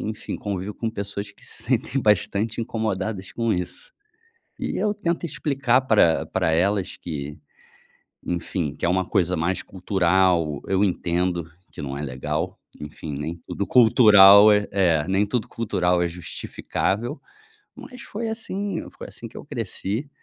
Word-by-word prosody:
enfim, 110 - -5
convivo 100 0 -4
com 115 - -3
pessoas 100 -1 -5
que - - -20
se - - -9
sentem 135 - 0
bastante 105 +1 +1
incomodadas 110 -4 -3
com 115 -1 0
isso. 95 - -5 0.7
E - - -3
eu 210 -1 +1
tento 175 -5 -2
explicar 140 -5 +1
para 105 -10 +3
para 80 - 0
elas 95 +4 0
que, 75 -2 -6 0.9
enfim, 85 -3 -2
que - - -6
é - - +2
uma 95 +1 +2
coisa 90 -1 +1
mais 90 +4 -1
cultural. 90 -5 +1
Eu 95 0 +1
entendo 90 -2 0 0.3
que - - -9
não 70 -1 -4
é - - -4
legal, 75 +3 -3 0.2
enfim, 75 +1 -7
nem 75 +4 -4
tudo 100 - -3
cultural 105 -4 +8
é 105 0 +2
é, 85 -5 +2
nem 100 +2 +2
tudo 115 +2 -1
cultural 90 -6 0
é 85 - +1
justificável, 95 - -3 0.6
mas 250 -1 -11
foi 225 +1 -4
assim 205 -4 -3
foi - - -10
assim - - -8
que - - -14
eu - - -9
cresci. 110 +9 -4
95 Hz, 150 wpm, -23 LUFS, 85-115 Hz, 0.9 s, cultural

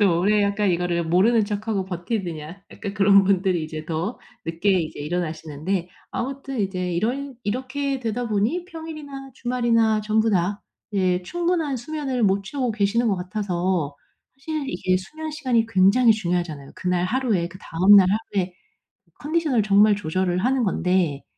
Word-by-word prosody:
또 180 -5 +4
오래 205 +3 +3
약간 200 0 +1
이거를 175 -1 0
모르는 205 +7 +3
척하고 205 -1 -2
버티느냐 175 -2 -5
약간 200 -1 -6
그런 200 -1 +5
분들이 185 -3 +2
이제 155 0 -6
더 165 +8 -3 0.3
늦게 170 +5 0
이제 155 - -5
일어나시는데 165 +2 -3 0.2
아무튼 270 -1 -4
이제 185 -2 -2
이런 255 +9 -2
이렇게 260 +5 -2
되다 240 +1 -2
보니 220 - 0
평일이나 305 -5 -8
주말이나 230 -3 +2
전부 220 +1 +1
다 195 +2 0 0.3
예 185 -2 +1
충분한 340 - -1
수면을 265 -1 -3
못 195 0 +2
채우고 255 +3 -2
계시는 220 +2 +1
것 195 - +1
같아서 180 -5 -2 0.4
사실 305 +1 -4
이게 185 +1 +1
수면 310 +12 -6
시간이 255 -7 +1
굉장히 225 +3 +5
중요하잖아요. 175 -8 -3
그날 180 -1 0
하루에 220 -6 0
그 185 +1 -12
다음 190 +3 +5
날 190 -2 +7
하루에 195 -3 -1 0.7
컨디션을 300 -7 +1
정말 205 +1 +5
조절을 180 0 -1
하는 260 0 +2
건데 180 -6 0
200 Hz, 350 characters per minute, -23 LUFS, 180-245 Hz, 0.7 s, 날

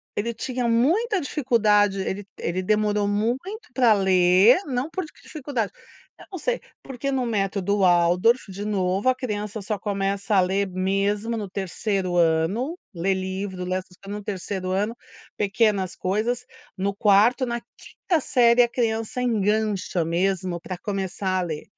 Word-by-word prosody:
ele 235 +3 -1
tinha 250 +1 -2
muita 355 - +2
dificuldade, 215 -8 +2
ele 190 +1 -4
ele 180 +2 -2
demorou 210 +1 +1
muito 260 - -2
para 240 -4 +5
ler, 190 - +5
não 265 +2 -2
por 375 +2 -3 0.2
dificuldade. 270 - -3 0.5
Eu - - -12
não 370 - -3
sei, - - -1 0.2
porque 270 +1 -4
no 260 -2 0
método 200 -2 0
Waldorf, 180 +5 +3
de 200 +2 -6
novo, 195 +2 +1
a 255 - +3
criança 210 -4 -4
só 210 +1 -3
começa 200 0 -1
a 190 - +6
ler 190 +2 0
mesmo 200 +4 0
no 205 -3 -4
3º 190 -1 -2
ano, 175 - +1 0.2
ler 190 +3 0
livro, 190 0 -4
ler, 185 +1 -1
essas 185 -1 -15
co 195 - -16
no 210 0 -4
3º 190 -2 -4
ano, 205 +5 0 0.4
pequenas 200 -2 +1
coisas, 230 +6 -1 0.3
no 195 +1 -1
4º, 210 +5 +4
na 235 0 -2 0.2
5º 345 -4 -2
série 245 -3 +4
a 240 - +3
criança 230 0 -1
engancha 210 -6 0
mesmo 180 +1 0
para 185 +1 -6
começar 190 -1 -2
a - - 0
ler. 160 -4 -4
205 Hz, 150 wpm, -24 LUFS, 190-235 Hz, 0.5 s, a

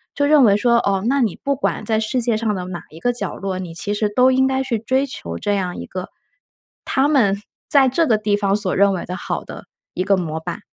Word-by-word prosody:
就 285 - +1
认 295 -1 +5
为 205 -4 +5
说， 235 +3 +2
哦， 195 -4 0
那 275 +2 +2
你 220 -7 0
不 280 0 +1
管 275 - -2
在 220 -1 +1
世 235 +3 -1
界 235 -1 +1
上 220 -1 -1
的 180 -1 -4
哪 180 -2 -6
一 160 - -13
个 245 +7 0
角 240 - -3
落， 190 -1 -4
你 180 -3 -6
其 200 +4 -1
实 210 0 0
都 250 +3 +5
应 260 0 +3
该 265 0 0
去 255 -3 -1
追 260 +5 0
求 85 - -6
这 205 - -1
样 185 -3 -3
一 - - -6
个 185 0 -6 0.8
他 270 +2 +2
们 210 -9 +2 0.3
在 275 -2 +5
这 325 +6 +2
个 220 - +3
地 210 -1 0
方 200 -1 0
所 200 -3 -2
认 200 +1 +4
为 180 - -4
的 180 - -5
好 - - -4
的 - - -10 0.3
一 185 - -1
个 195 +1 +2
模 160 -3 -3
板。 175 +1 -5
210 Hz, 275 characters per minute, -20 LUFS, 190-255 Hz, 0.8 s, 认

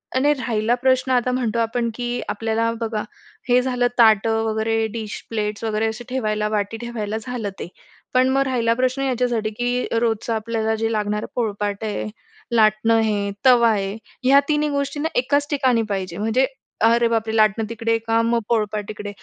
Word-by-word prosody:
आणि 285 +3 +3
राहिला 230 -3 0
प्रश्न 260 +1 +1
आता 250 0 +2
म्हणतो 235 -3 -1
आपण, 230 +1 0
की 245 0 -3
आपल्याला 225 +2 0
बघा 220 -2 -2 0.5
हे 250 +1 +5
झालं 250 -1 +1
ताटं 225 -1 +4
वगैरे, 220 0 0
डिश, 220 -2 -5
प्लेट्स 210 -1 -3
वगैरे 220 0 0
असे 220 +2 -5
ठेवायला 215 -4 -1
वाटी 210 +1 -2
ठेवायला 220 -2 -4
झालं 235 -3 -4
ते. - - -5 0.5
पण 255 +1 +4
मग 270 +1 +2
राहिला 235 -3 +1
प्रश्न 255 +2 0
याच्यासाठी, 245 -4 0
की 245 +3 -1
रोजचं 230 0 0
आपल्याला 220 0 -1
जे 225 +1 -1
लागणारं 210 -1 -1
पोळपाट 205 -3 -2
आहे 215 0 -3 0.5
लाटणं 215 +1 +4
आहे 210 -3 +1
तवा 240 -2 +6
आहे 200 -1 -1 0.3
ह्या 275 +2 +6
तिन्ही 300 0 +1
गोष्टींना 285 +2 -2
एकाच 285 +3 +1
ठिकाणी 260 -5 +2
पाहिजे 185 -3 -3
म्हणजे 225 +5 +2 0.4
"अरे 235 +1 +4
बापरे! 225 -1 -1
लाटणं 215 0 +3
तिकडे 230 0 0
का? 225 0 +1 0.3
पोळपाट 210 -2 0
तिकडे." 210 -1 -6
225 Hz, 160 wpm, -22 LUFS, 215-250 Hz, 0.5 s, तवा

